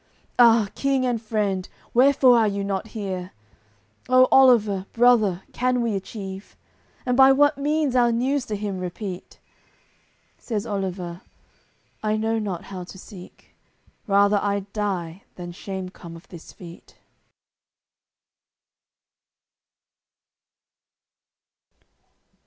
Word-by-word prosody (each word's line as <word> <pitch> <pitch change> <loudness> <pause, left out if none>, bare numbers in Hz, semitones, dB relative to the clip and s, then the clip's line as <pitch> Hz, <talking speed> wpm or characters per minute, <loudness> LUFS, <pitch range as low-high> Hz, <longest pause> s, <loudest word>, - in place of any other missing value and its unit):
Ah! 230 -3 +6
King 275 -2 0
and 240 -3 -1
friend, 210 -4 -2 0.2
wherefore 260 0 +5
are 220 - +3
you 200 -1 -2
not 195 +2 -3
here? 190 -5 -6 0.7
How, 255 0 +5
Oliver, 215 -8 +4
brother, 225 -6 +3
can 250 0 0
we 225 -3 -1
achieve? 195 0 -8 0.5
And 250 -1 +1
by 265 +1 +7
what 290 +1 +3
means 295 -2 0
our 240 -1 +4
news 255 +3 -1
to 215 - -3
him 200 -2 -4
repeat?" 180 +1 -7 1.0
Says 220 -3 -4
Oliver: 185 -4 -4 0.8
"I 215 0 0
know 225 +1 0
not 195 -5 -4
how 185 -2 -8
to 185 - -12
seek; 185 -1 -14 0.5
Rather 200 +1 +4
I'ld 200 0 -3
die 190 -4 -3
than 175 -1 -8
shame 190 +1 -6
come 170 -2 -12
of 165 - -14
this 170 -3 -12
feat." 170 -1 -14
205 Hz, 110 wpm, -23 LUFS, 190-245 Hz, 1.0 s, by